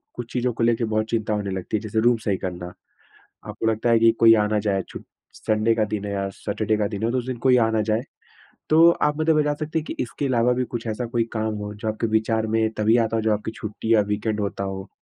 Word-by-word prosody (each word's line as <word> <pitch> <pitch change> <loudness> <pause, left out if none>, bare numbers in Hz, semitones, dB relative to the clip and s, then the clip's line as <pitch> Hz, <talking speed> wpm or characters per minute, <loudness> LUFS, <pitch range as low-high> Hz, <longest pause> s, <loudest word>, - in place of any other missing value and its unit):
कुछ 120 -1 -7
चीज़ों 125 -1 0
को 115 - -2
लेकर 115 0 +2
बहुत 110 0 -1
चिंता 110 -2 -1
होने 100 -2 -2
लगती 95 +3 -2
है, - - -6
जैसे 110 0 -2
रूम 120 0 +4
सही 100 -3 +1
करना, 90 -1 -6 0.7
आपको 110 - -5
लगता 110 +1 +1
है 115 - +5
कि 115 0 +5
कोई 115 0 +8
आ 105 -1 +2
ना 105 0 +1
जाए, 100 -2 0
छू - - -8 0.3
संडे 110 +1 +1
का 110 -1 +1
दिन 105 -1 -4
है 100 - -4
या 100 0 -2
सैटरडे 110 +1 -2
का 105 -1 0
दिन 105 0 -6
है, 115 - +1
तो 130 - +1
उस 125 - -4
दिन 130 -2 -3
कोई 125 -1 +6
आ 115 -2 +3
ना 110 -1 +1
जाए। 110 +3 -1 0.7
तो 165 +2 +7
आप 150 0 +2
मुझे 155 +1 +2
बता 150 -1 +2
सकती 155 +2 -3
हैं 155 - -4
कि - - -5
इसके 140 +3 -4
अलावा 125 -1 +2
भी 125 +1 0
कुछ 120 -1 -6
ऐसा 115 +2 -3
कोई 115 0 0
काम 110 -1 -2
हो, 105 0 -5
जो 110 +1 -5
आपके 110 +1 -1
विचार 110 0 0
में 110 0 +1
तभी 110 +2 +3
आता 115 -1 +1
हो, 110 - 0
जब 110 - +1
आपकी 105 +1 -1
छुट्टी 110 +1 -3
या 105 - +5
वीकेंड 105 +1 -1
होता 100 -1 -3
हो? 95 0 -5
110 Hz, 270 wpm, -23 LUFS, 105-120 Hz, 0.7 s, कोई